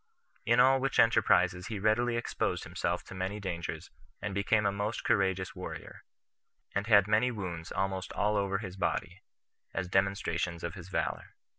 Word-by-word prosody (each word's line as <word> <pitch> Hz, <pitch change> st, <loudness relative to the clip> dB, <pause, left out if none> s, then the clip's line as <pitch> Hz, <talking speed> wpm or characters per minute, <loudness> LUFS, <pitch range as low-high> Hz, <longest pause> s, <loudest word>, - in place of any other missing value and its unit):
In 120 Hz, +2 st, +4 dB
all 130 Hz, +1 st, +6 dB
which 135 Hz, 0 st, -1 dB
enterprises 90 Hz, -5 st, +4 dB
he 110 Hz, -, -4 dB
readily 115 Hz, +4 st, +2 dB
exposed 120 Hz, -, -1 dB
himself -, -, -2 dB
to -, -, -11 dB
many 95 Hz, +2 st, -3 dB
dangers, 90 Hz, -4 st, -5 dB, 0.3 s
and 105 Hz, -1 st, -4 dB
became 100 Hz, +2 st, +2 dB
a 100 Hz, -, +3 dB
most 105 Hz, +2 st, -3 dB
courageous 95 Hz, -2 st, +1 dB
warrior; -, -, -8 dB, 0.7 s
and 100 Hz, +2 st, -1 dB
had 100 Hz, -3 st, +6 dB
many 110 Hz, +4 st, +3 dB
wounds 90 Hz, -7 st, -5 dB
almost 95 Hz, -1 st, -2 dB
all 105 Hz, +1 st, +1 dB
over 100 Hz, -1 st, +1 dB
his 95 Hz, -3 st, -7 dB
body, 95 Hz, -, -2 dB, 0.5 s
as 95 Hz, -, -1 dB
demonstrations 90 Hz, -3 st, 0 dB
of 85 Hz, -, -3 dB
his 90 Hz, 0 st, -10 dB
valor. -, -, -3 dB
100 Hz, 160 wpm, -31 LUFS, 95-110 Hz, 0.7 s, all